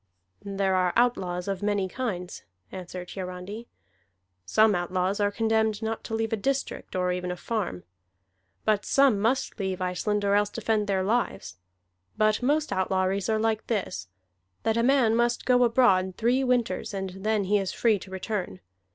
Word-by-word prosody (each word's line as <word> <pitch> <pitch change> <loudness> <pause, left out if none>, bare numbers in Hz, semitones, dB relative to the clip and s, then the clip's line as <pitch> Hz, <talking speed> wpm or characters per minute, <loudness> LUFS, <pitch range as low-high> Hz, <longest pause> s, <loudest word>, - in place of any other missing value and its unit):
"There 195 -1 0
are 185 -1 +2
outlaws 185 -7 +1
of 195 -1 -2
many 205 -2 0
kinds," 185 -5 -4 0.3
answered 180 -1 -7
Hiarandi. 190 +4 -6 0.8
"Some 215 - +4
outlaws 185 +2 -1
are 205 0 +3
condemned 220 0 0
not 220 0 -3
to 225 - -3
leave 225 0 -1
a - - +1
district, 270 +1 -3
or 180 0 +1
even 180 0 -3
a 180 - -2
farm; 180 - -3 0.8
but 210 -1 +2
some 275 -7 +4
must 235 +3 0
leave 190 -1 -2
Iceland 195 +3 -1
or 200 - +2
else 205 0 +3
defend 220 -2 -1
their 190 -2 +1
lives. 200 - -1 0.6
But 215 +1 +2
most 295 +4 +1
outlawries 190 +2 0
are 220 - +2
like 220 0 0
this, 190 - -2 0.6
that 225 - +1
a 230 - +2
man 245 -3 +4
must 240 +1 +1
go 250 -1 +4
abroad 210 -7 +3
three 245 +4 +2
winters, 240 -6 0
and 190 -1 -3
then 215 -1 +1
he 205 +2 +2
is 190 -1 -2
free 220 -4 +2
to 190 - -11
return. 190 - -4
205 Hz, 165 wpm, -27 LUFS, 185-225 Hz, 0.8 s, Some